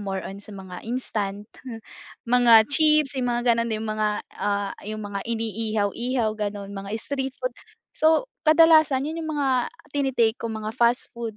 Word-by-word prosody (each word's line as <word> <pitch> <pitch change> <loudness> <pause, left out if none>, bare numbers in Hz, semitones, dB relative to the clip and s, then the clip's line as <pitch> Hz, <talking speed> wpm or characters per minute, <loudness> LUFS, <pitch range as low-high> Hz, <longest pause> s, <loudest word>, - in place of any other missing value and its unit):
more 195 -2 -4
on 195 +1 -8
sa 205 0 -12
mga 185 -2 -9
instant, 210 -4 -3 0.8
mga 235 -2 +6
chips, 305 -1 +4
yung 250 -1 0
mga 240 0 +2
ganon 230 0 -1
yung 215 0 -4
mga, 215 0 0 0.3
ah, 200 -1 -1 0.2
yung 215 0 -5
mga 200 -1 -4
iniihaw-ihaw 225 +1 -1
ganon, 205 -1 -4
mga 195 0 -7
street 265 +2 -4
food. - - -3 0.4
So 320 +9 +3 0.2
kadalasan 310 -4 +5
yun 320 +2 -4
yung 315 -1 -4
mga 280 -2 +1 0.5
tini-take 260 -5 +1
ko - - -3
mga 215 0 -5
fast 240 +1 +1
food 230 -2 -6
230 Hz, 160 wpm, -24 LUFS, 210-265 Hz, 0.8 s, mga